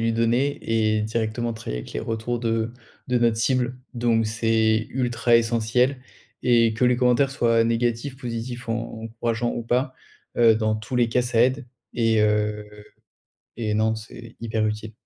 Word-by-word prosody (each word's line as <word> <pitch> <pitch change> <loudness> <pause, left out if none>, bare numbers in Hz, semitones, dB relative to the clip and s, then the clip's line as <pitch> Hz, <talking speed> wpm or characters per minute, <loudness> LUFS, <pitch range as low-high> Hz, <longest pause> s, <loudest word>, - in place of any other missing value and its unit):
lui 115 0 +1
donner 120 +5 +1
et 110 -1 +1
directement 115 +2 -2
travailler 110 - -5
avec - - -11
les - - -3
retours 115 +1 -3
de 115 0 -1 0.4
de 125 - +2
notre 115 -2 +2
cible. 125 +1 0 0.2
Donc 115 -2 +1
c'est 110 0 +1
ultra 120 -2 +2
essentiel 120 +3 +1 0.4
et 115 -2 +4
que 115 +3 0
les 125 -1 +3
commentaires 125 +2 +3
soient 115 -3 +2
négatifs, 120 +3 -1
positifs 120 -1 -6
ou 115 - +1
en 115 -1 -5
encourageant 115 +1 -2
ou 120 - -4
pas. 125 +4 0 0.5
Heu, 115 -2 +6
dans 110 0 0
tous 110 +4 -5
les 120 -1 +3
cas 125 - +2
ça 120 -2 +1
aide 130 +1 +1 0.3
et 115 -2 +2
heu, 105 0 +1 0.9
et 110 -2 -2
non, 110 +1 +2
c'est 115 +1 -11
hyper 110 -2 -1
utile. 105 +1 -4
115 Hz, 165 wpm, -24 LUFS, 110-120 Hz, 0.9 s, Heu